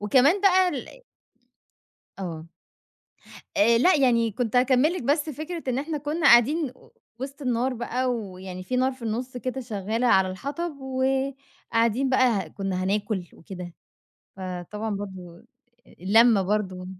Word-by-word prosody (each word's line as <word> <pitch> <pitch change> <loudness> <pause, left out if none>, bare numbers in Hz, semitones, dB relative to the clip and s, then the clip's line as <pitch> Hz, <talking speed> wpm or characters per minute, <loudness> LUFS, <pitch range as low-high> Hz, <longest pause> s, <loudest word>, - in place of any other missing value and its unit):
وكمان 260 - +4
بقى 375 -2 +5
ال - - -7 1.2
آه. 165 -3 -6 1.1
آآ، 230 +3 +5
لأ 360 +6 +5
يعني 235 -4 +3
كنت 240 +1 -2
هاكمل 260 +5 +4
لِك 365 - -4
بس 295 +4 +1
فكرة 315 +4 -6
إن 255 +1 0
إحنا 300 +1 -3
كنّا 300 +3 -1
قاعدين 260 +4 +5 0.5
وسط 275 +2 -7
النار 250 +1 0
بقى، 245 +2 -2
ويعني 185 -4 -7
في 250 +7 -3
نار 260 +1 +2
في 255 - -15
النُص 245 +3 -3
كده 255 +1 -4
شغّالة 225 +1 -2
على 190 -4 +4
الحطب، 285 - -5
وقاعدين 265 -2 -1
بقى 255 -1 +4 0.2
ه - - -12
كنّا 185 0 -3
هناكل 200 -2 -1
وكده، 180 0 -9 0.6
فطبعًا 185 +4 -5
برضو 185 -4 -8 0.6
اللمة 215 +2 +5
برضو 190 -2 -2
240 Hz, 135 wpm, -25 LUFS, 195-270 Hz, 1.2 s, بقى